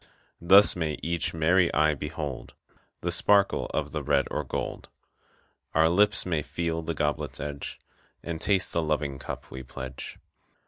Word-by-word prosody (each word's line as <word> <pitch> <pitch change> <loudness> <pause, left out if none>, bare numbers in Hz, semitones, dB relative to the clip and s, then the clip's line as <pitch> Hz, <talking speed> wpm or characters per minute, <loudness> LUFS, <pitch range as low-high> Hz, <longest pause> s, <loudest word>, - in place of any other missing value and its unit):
Thus 95 +4 +7
may 80 -4 -2
each 85 0 -1
merry 85 +3 +3
eye 75 0 +4
behold 75 -2 -6 0.5
The 85 - -1
sparkle 100 +3 +3
of - - -2
the - - -3
red - - +2
or 75 - -1
gold. 65 - -5 0.9
Our 80 +1 +5
lips 105 +3 +3
may 80 -4 0
feel 80 +1 -3
the 80 0 -4
goblet's 75 -1 -2
edge 70 -1 -5 0.5
And 85 -1 -5
taste 95 -3 +2
the 85 - +1
loving 75 -3 -1
cup - - -7
we 65 - -6
pledge. 65 0 -8
80 Hz, 150 wpm, -27 LUFS, 75-85 Hz, 0.9 s, Thus